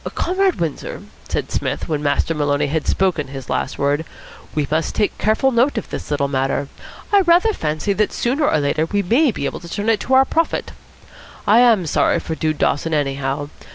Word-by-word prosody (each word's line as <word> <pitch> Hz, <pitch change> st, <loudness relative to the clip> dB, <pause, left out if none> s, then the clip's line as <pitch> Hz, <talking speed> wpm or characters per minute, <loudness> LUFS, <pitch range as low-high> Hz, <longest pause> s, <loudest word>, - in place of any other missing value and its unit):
"Comrade 375 Hz, +1 st, +1 dB
Windsor," 160 Hz, -4 st, -4 dB, 0.3 s
said -, -, -3 dB
Psmith, -, -, -2 dB
when 150 Hz, -2 st, -1 dB
Master 145 Hz, +3 st, +1 dB
Maloney 145 Hz, -1 st, 0 dB
had 150 Hz, +1 st, -2 dB
spoken 180 Hz, -7 st, +1 dB
his 135 Hz, -1 st, -8 dB
last -, -, -2 dB
word, 145 Hz, +2 st, +1 dB, 0.5 s
"we 150 Hz, -2 st, 0 dB
must 160 Hz, +1 st, 0 dB
take 210 Hz, -, 0 dB
careful 220 Hz, +6 st, +2 dB
note 245 Hz, +2 st, +2 dB
of 225 Hz, -, -4 dB
this -, -, -6 dB
little 145 Hz, -1 st, 0 dB
matter. 135 Hz, +1 st, -1 dB, 0.4 s
I 400 Hz, -, +7 dB
rather 360 Hz, +5 st, +4 dB
fancy 155 Hz, -, -1 dB
that 210 Hz, +1 st, 0 dB
sooner 280 Hz, +5 st, 0 dB
or -, -, +2 dB
later 150 Hz, +2 st, 0 dB
we 200 Hz, +3 st, 0 dB
may 250 Hz, -, +3 dB
be 140 Hz, -, -4 dB
able -, -, -3 dB
to 170 Hz, -, -11 dB
turn 205 Hz, +5 st, -2 dB
it 220 Hz, -2 st, +3 dB
to 260 Hz, -, +1 dB
our 265 Hz, 0 st, +6 dB
profit. 330 Hz, +3 st, -1 dB, 0.7 s
I 220 Hz, +3 st, +5 dB
am 230 Hz, -7 st, +4 dB
sorry 155 Hz, -, +2 dB
for 160 Hz, -, -5 dB
Dude 155 Hz, -1 st, -1 dB
Dawson, 155 Hz, +3 st, 0 dB
anyhow. 140 Hz, 0 st, -2 dB
165 Hz, 195 wpm, -20 LUFS, 145-235 Hz, 0.7 s, I